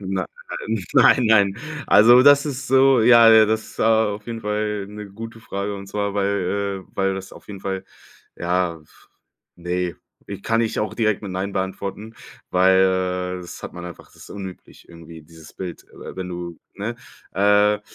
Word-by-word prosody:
nei 95 -1 -3 0.7
nein, 125 - +6
nein. 100 -3 +4 0.3
Also, 120 +4 +7
das 145 +1 +6
ist 135 -2 -5
so, 135 -1 +5
ja, 115 0 +7
äh 110 -1 +7
das 110 +1 -3
auf 110 -2 +1
jeden 115 -1 -5
Fall 105 -1 -2
'ne 105 0 -9
gute 115 +2 -9
Frage. 100 -1 -4
Und 100 0 -8
zwar, 100 0 -3
weil, 100 0 -1
äh - - -31
weil 95 0 +1
das 95 0 -8
auf - - -14
jeden 100 -2 -8
Fall, 95 0 -4 0.5
ja, 85 -1 -1
f 75 - -24 0.5
ne. 90 0 -3 0.3
Ich 100 -1 -8
kann 115 0 +1
ich 115 -1 -1
auch 105 - -2
direkt 110 -3 0
mit 100 -3 -7
nein 95 +2 -3
beantworten, 100 +3 -5 0.4
weil 95 0 +2
das 85 - -10
hat - - -7
man 90 0 -9
einfach 85 -3 -10
das - - -25
ist - - -14
unüblich 95 -2 -10
irgendwie 85 -1 -13
dieses 80 0 -16
Bild, 90 -3 -7
äh, - - -10
wenn 95 -1 -6
du, 85 -2 -7
ne 105 +4 -4 0.4
äh, 105 +1 +3
100 Hz, 175 wpm, -22 LUFS, 95-110 Hz, 0.7 s, Also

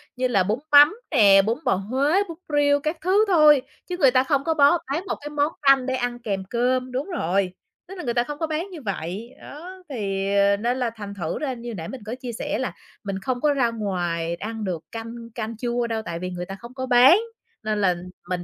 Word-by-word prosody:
như 255 0 0
là 200 -6 +2
bún 215 +6 -1
mắm 295 +7 +8 0.2
nè, 200 -7 +6
bún 230 +6 -1
bò - - +3
Huế, 275 - +1
bún 325 - -7 0.2
riêu 285 0 +4
các 310 +3 -2
thứ 390 +5 +3
thôi, 305 -6 +6 0.3
chứ 355 - -3
người 270 -7 +5
ta 255 0 +4
không 275 0 +1
có 320 - +1
bó 290 +3 +5
bán 325 +6 -1
một - - -1
cái 295 - -6
món 295 +1 0
canh 275 -2 +5
để 260 0 -1
ăn 245 -1 -2
kèm 200 -5 -3
cơm. 250 +1 0
Đúng 265 +8 -3
rồi, 190 - -1 0.3
tức 385 - -9
là - - -6
người 235 - -1
ta 240 0 +2
không 295 +2 -7
có 320 - -1
bán 320 +5 -3
như 325 -5 -8
vậy. 200 +3 -5
Đó, 365 +5 -10
thì, 195 -6 -2
ờ, 200 0 +4
nên 240 +4 -1
là 245 -2 0
thành 205 -2 -7
thử 170 -4 -4
ra 275 -4 -2
như 240 0 -8
hồi 225 - -5
nãy 165 -1 -6
mình 255 -5 -8
có 230 +3 -4
chia 255 -2 -7
sẻ 290 +5 -3
là 260 - -3 0.3
mình 195 -1 -4
không 245 +4 -3
có 295 -1 +3
ra 250 -4 +2
ngoài 175 -6 -2
ăn 220 +3 -6
được 175 -5 -3
canh 230 +1 -7
canh 220 -1 -4
chua 240 0 -1
đâu 225 -1 -2
tại 170 0 -4
vì 180 +1 -4
người 180 0 -5
ta 195 - -7
không 240 +1 -11
có 260 -1 -4
bán, 255 +8 +7 0.5
nên 215 -1 -1
là 180 -2 +3 0.3
mình 180 -1 -2
245 Hz, 245 wpm, -23 LUFS, 200-285 Hz, 0.5 s, mắm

